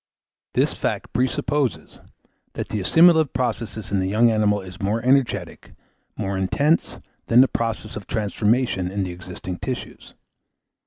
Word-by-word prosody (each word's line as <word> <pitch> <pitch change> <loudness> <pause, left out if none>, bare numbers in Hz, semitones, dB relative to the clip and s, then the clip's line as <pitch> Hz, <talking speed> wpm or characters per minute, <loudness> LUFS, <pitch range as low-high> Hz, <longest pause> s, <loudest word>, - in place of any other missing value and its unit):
This - - +2
fact - - -3
presupposes, 130 +1 -1 0.5
that - - -5
the 105 - -2
assimilative 160 - +5
process 115 -4 -3
in 100 - +1
the 95 - 0
young 115 +4 +3
animal 105 -2 +2
is 95 -1 -10
more 105 +3 0
energetic, 130 0 0 0.4
more 100 -2 -2
intense, 145 - +1 0.3
than 120 +2 +6
the 135 - +5
process 115 -2 -3
of 105 - -8
transformation 105 -2 0
in 100 +1 -2
the 90 - -4
existing 90 0 -7
tissues. 130 -2 -6
110 Hz, 140 wpm, -22 LUFS, 95-130 Hz, 0.5 s, than